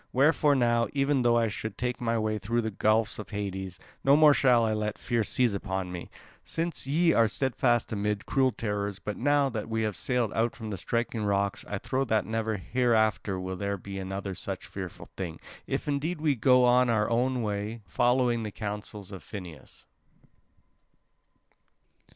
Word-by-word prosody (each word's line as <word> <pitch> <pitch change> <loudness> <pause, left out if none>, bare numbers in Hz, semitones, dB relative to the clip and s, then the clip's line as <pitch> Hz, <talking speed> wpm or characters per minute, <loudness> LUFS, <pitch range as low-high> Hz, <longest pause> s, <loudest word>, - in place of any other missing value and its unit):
Wherefore 145 +2 +4
now, 120 -2 +2
even 140 -1 +2
though 120 -1 +4
I 115 -1 +3
should 110 0 -5
take 125 0 -2
my 115 -1 +1
way 110 -1 -1
through 115 +4 0
the 110 - -2
gulfs 110 +2 +1
of 100 -3 -7
Hades, 95 -3 -4 0.3
no 140 +1 +6
more 155 -1 +7
shall 125 -5 +4
I 110 - +1
let 105 -1 -2
fear 120 -2 0
seize 120 +1 +1
upon 95 -2 -3
me, 90 -1 -7 0.3
since 165 -4 -3
ye 165 +4 +3
are 115 -1 +4
steadfast 120 0 +1
amid 105 0 -1
cruel 130 -2 +2
terrors. 105 -3 -3
But 105 +1 -5
now 145 +1 +2
that 110 -3 -4
we 110 0 0
have 105 -3 -1
sailed 120 +4 -1
out 115 +1 0
from 110 -2 -6
the 100 - -3
striking 115 -1 -1
rocks, 100 -1 0
I 105 - -3
trow 130 +6 -1
that 110 -3 +1
never 110 -1 -1
hereafter 110 -3 +1
will 95 0 -4
there 100 +1 -2
be 95 +1 -7
another 95 +1 -4
such - - -5
fearful - - -8
thing, 85 -4 -5 0.3
if - - -2
indeed 150 +4 -1
we 150 -2 +2
go 125 +1 +4
on 125 0 +4
our 110 -2 +2 0.3
way 105 0 -3
following 120 +6 +2
the 110 - -3
counsel 105 0 -5
of 95 -3 -8
Phineus." 85 -5 -10
110 Hz, 175 wpm, -28 LUFS, 100-125 Hz, 0.3 s, more